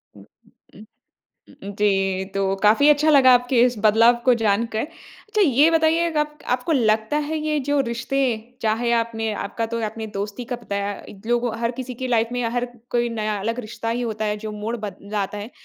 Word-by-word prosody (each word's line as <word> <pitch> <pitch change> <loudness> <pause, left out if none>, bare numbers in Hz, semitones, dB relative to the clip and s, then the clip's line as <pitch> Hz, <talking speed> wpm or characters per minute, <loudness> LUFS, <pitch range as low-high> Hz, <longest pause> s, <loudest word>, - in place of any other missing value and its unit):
उम, - - -15 0.5
उ - - -14 0.8
उम, 200 +1 -6
जी, 195 -2 +1
तो 195 0 0
काफ़ी 220 +8 +5
अच्छा 300 +1 +4
लगा 265 -3 +7
आपके 245 0 +2
इस 250 -1 +1
बदलाव 230 +3 +5
को 250 -1 +5
जान 215 +2 +2
कर। 220 - 0
अच्छा, 420 +6 -6
ये 295 0 +4
बताइए 325 +1 +2
गप 300 0 -1 0.2
आपको 255 +6 -2
लगता 220 +1 +2
है, 315 0 -2
ये 305 0 -1
जो 290 -1 +3
रिश्ते, 260 +4 -2 0.4
चाहे 225 +2 +1
आपने 225 -1 -2
आपका 225 +3 -3
तो 230 - -1
आपने 220 +1 -5
दोस्ती 205 +4 -4
का - - -1
बताया। 200 -1 -3 0.3
लोगों 240 -1 0
हर 230 0 +1
किसी 255 -1 -6
की - - 0
लाइफ़ 230 -1 +2
में 245 - -2
या 230 - 0
हर 245 - -1 0.3
कोई 240 0 +1
नया 210 -1 -1
अलग 230 +4 -2
रिश्ता 225 0 -6
ही 235 +2 -1
होता 220 -2 -3
है, 210 0 -1
जो 215 - -4
मोड़ 230 +3 -3
बद 195 -2 -7 0.2
लाता 205 +1 -2
है। 210 +4 -7
235 Hz, 200 wpm, -22 LUFS, 215-260 Hz, 0.8 s, लगा